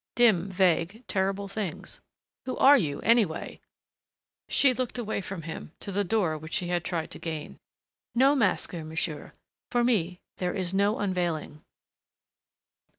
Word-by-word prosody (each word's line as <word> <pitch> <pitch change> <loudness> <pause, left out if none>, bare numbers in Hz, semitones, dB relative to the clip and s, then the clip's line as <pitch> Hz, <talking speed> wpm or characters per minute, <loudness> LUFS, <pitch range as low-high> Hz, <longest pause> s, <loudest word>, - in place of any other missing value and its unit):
Dim, 215 -7 +4
vague, 185 +3 +1
terrible 195 +1 -1
things.... 195 -4 -6 0.5
"Who 255 - -2
are 280 +2 +8
you, 150 - 0
anyway?" 225 -9 +1 0.9
She 275 -2 +4
looked 250 -1 -3
away 220 -4 -2
from 190 -3 -6
him, 165 0 -7
to 200 - -5
the 205 +1 +1
door 185 -6 0
which 155 +2 -9
she 180 -4 0
had 175 -1 0
tried 165 -2 -3
to - - -6
gain. 160 -3 -6 0.6
"No 265 +4 +5
masker, 185 - 0
monsieur.... 155 -1 -4 0.4
For 240 0 +2
me, 185 -7 +1 0.2
there 180 -1 -2
is 185 -2 -2
no 200 +2 +2
unveiling." 175 -6 -2
190 Hz, 145 wpm, -28 LUFS, 165-220 Hz, 0.9 s, are